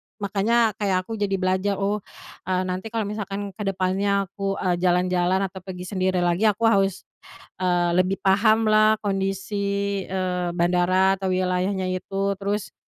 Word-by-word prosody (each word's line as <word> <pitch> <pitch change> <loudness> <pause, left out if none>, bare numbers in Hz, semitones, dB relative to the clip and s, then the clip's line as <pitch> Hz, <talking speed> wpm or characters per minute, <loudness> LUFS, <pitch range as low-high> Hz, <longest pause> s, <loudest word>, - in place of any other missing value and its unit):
makanya 215 +3 +1
kayak 190 -3 +1
aku 225 - -6
jadi 200 -1 0
belajar 185 +2 0
oh, 205 0 -1 0.4
eee, 185 0 0
nanti 185 +4 -4
kalau 225 -3 -2
misalkan 200 -2 -5
kedepannya 195 0 0
aku, 195 0 -3
eee, 180 -2 +1
jalan-jalan 180 +1 +2
atau 190 0 -10
pergi 185 -1 -7
sendiri 185 -1 0
lagi 175 +5 +2
aku 210 +2 0
harus, 195 -3 +1 0.6
eee, 175 -1 +2
lebih 185 +2 +1
pahamlah 215 +2 +4
kondisi, 200 0 -2
eee, 180 -2 -1
bandara 180 +2 +3
atau 190 -1 -3
wilayahnya 185 +1 0
itu 195 +2 -2
terus, 200 +1 -3
195 Hz, 140 wpm, -24 LUFS, 185-200 Hz, 0.6 s, pahamlah